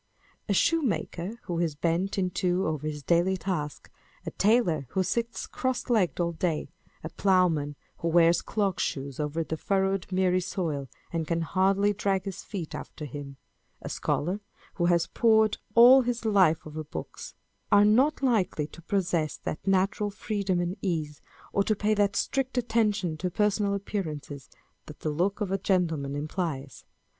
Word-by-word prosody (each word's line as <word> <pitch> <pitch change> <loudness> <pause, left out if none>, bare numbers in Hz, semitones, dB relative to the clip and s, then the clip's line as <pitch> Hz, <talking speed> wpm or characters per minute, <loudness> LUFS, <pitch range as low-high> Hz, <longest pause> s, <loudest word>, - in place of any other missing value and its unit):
A - - +3
shoemaker, 215 - 0
who 170 -2 -3
is 165 -4 0
bent 170 +6 0
in 185 -2 0
two 180 +1 0
over 155 -1 -2
his 150 -1 -5
daily 175 +4 +2
task; 170 -6 -4 0.3
a - - -4
tailor 190 - +2
who 190 - 0
sits 230 +6 -2
cross 260 -1 -2
legged 200 -8 +2
all 170 -1 +1
day; 165 -1 -2 0.3
a 160 - -4
ploughman 170 -8 +2 0.2
who 170 - -3
wears 170 0 +4
clog 200 -4 -1
shoes 135 0 -3
over 150 +2 -1
the 160 0 -4
furrowed 195 +1 0
miry 185 0 +2
soil, 160 -6 -3 0.3
and 165 -2 -1
can 170 0 0
hardly 195 +5 +2
drag 195 -1 0
his 195 -3 -5
feet 180 -7 -6
after 150 - -7
him; 140 0 -8 0.4
a - - -7
scholar 180 +7 -1 0.3
who 175 - 0
has 170 -1 +3
pored 220 0 +3 0.2
all 250 +3 +9
his 245 -1 -2
life 185 -7 +3
over 155 0 -6
books, 150 - -8 0.4
â€" 205 - +7
are 205 - +6
not 265 +8 +3
likely 195 - +1
to 170 - -13
possess 170 -3 -1
that 155 - -6
natural 195 +2 +2
freedom 200 -3 -2
and 175 +3 -2
ease, 155 -6 -2 0.3
or 200 - +3
to 215 - +1
pay 210 +1 +1
that 205 -1 +2
strict 265 -1 -1
attention 210 -8 +1
to 180 +3 -2
personal 205 +1 +1
appearances, 155 -8 -5 0.4
that 150 - -11
the 155 - -1
look 185 +8 0
of 200 -3 -1
a 195 - 0
gentleman 165 -8 0
implies. 150 -2 -4
185 Hz, 165 wpm, -28 LUFS, 160-205 Hz, 0.4 s, all